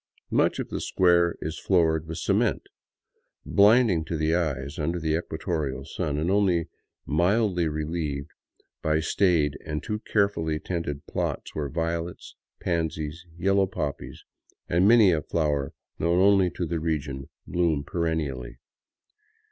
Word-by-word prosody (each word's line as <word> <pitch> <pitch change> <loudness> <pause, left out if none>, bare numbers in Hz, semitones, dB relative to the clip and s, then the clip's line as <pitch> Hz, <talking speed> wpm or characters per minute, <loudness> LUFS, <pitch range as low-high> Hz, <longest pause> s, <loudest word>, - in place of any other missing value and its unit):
Much - - +2
of - - -4
the - - -4
square 85 -2 +3
is 80 +1 -4
floored 80 -4 +2
with 80 0 -5
cement, - - +1 0.8
blinding 105 -4 +5
to 80 +1 -3
the 80 +1 +1
eyes 70 -5 -1
under 85 +4 -1
the 80 -1 0
equatorial 80 -5 -3
sun 75 -1 -3
and 80 +5 0
only 90 -5 +2 0.4
mildly 90 +2 +2
relieved 75 -1 -3 0.5
by 80 0 +1
staid 80 -3 +2
and 75 -1 -4
too 105 0 -3
carefully 100 -8 0
tended 80 -5 -4
plots - - -3
where 75 -2 -3
violets, 85 +2 -3 0.3
pansies, 80 -1 -2
yellow 95 +2 +2
poppies, 75 -6 -5 0.4
and 90 +3 +3
many 110 -4 +7
a 80 -2 +1
flower 75 -3 -1 0.3
known 85 +2 +2
only 95 -1 +5
to 90 +1 -4
the 85 0 -2
region 75 -4 -3 0.2
bloom 85 -5 0
perennially. 80 -7 -3
80 Hz, 130 wpm, -26 LUFS, 75-90 Hz, 0.8 s, many